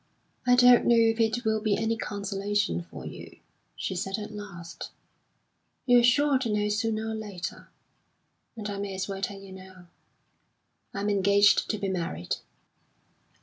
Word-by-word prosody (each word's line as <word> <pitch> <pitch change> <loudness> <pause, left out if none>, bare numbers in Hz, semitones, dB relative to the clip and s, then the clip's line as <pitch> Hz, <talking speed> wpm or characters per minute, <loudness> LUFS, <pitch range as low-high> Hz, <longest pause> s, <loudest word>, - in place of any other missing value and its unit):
"I 245 - +6
don't 245 -1 +6
know 235 - +6
if 225 0 +3
it 225 +2 +1
will 220 0 +1
be 210 -2 +1
any 225 +1 0
consolation 200 - -2
for - - -9
you," - - -9 0.4
she - - -3
said 195 +2 -2
at 210 0 -7
last; 185 -5 -8 1.0
"you're 245 -2 +6
sure 270 +3 +4
to 250 -3 -2
know 210 0 0
sooner 220 +1 -1
or - - -3
later, 205 -5 -6 0.9
and 210 -2 -5
I 200 -1 -4
may 200 -1 -4
as 190 0 -3
well 195 -1 -5
tell 195 0 -3
you 195 -1 -12
now. 185 -2 -13 1.0
I'm 205 +1 -2
engaged 200 +1 +4
to 215 - 0
be 200 -1 -3
married." 165 - -3
205 Hz, 155 wpm, -27 LUFS, 195-225 Hz, 1.0 s, I